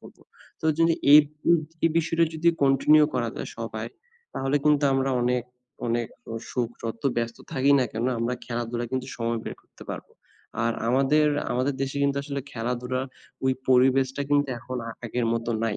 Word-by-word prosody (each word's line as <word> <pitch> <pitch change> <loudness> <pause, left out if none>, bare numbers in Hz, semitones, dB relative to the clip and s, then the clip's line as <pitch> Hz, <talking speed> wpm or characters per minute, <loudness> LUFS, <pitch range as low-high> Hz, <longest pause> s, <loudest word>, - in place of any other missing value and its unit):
করব। - - -15 0.4
তো - - -1
যদি 165 0 +4 0.2
এই 150 - +12 0.3
উ - - +8 0.3
এই 165 - +5
বিষয়টা 165 +1 +2
যদি 170 +2 +2
continue 150 +3 +5
করা - - 0
যায় - - -5
সবাই, - - -4 0.5
তাহলে 135 +2 0
কিন্তু 150 -1 +4
আমরা 135 0 +1
অনেক, 125 0 +1 0.4
অনেক 120 0 0 0.4
সুখ 120 -2 -1 0.2
যতো 115 +4 -3
ব্যস্ত 115 0 -1
থাকি 135 +2 +2
না 130 - +3
কেনো? 120 +3 -1
আমরা 120 +2 -1
খেলাধুলায 120 0 -3
কিন্তু 130 0 -2
সময় 115 0 -1
বের - - -5
করতে - - -16
পারব। - - -6 0.6
আর 115 - +2 0.2
আমাদের 135 +4 +3 0.3
আমাদের 130 +3 0
দেশে 135 +1 -3
কিন্তু 140 0 +1
আসলে 140 -1 -3
খেলাধুলার 125 +2 -2 0.4
ওই 130 - +3 0.2
পরিবেশটা 130 +1 +3
কিন্তু 145 -1 +3
এখন 130 +2 -6
আ - - -4
আগের 115 +1 -1
মত 115 0 -2 0.2
নাই। 110 -2 -1
130 Hz, 170 wpm, -26 LUFS, 120-140 Hz, 0.6 s, এই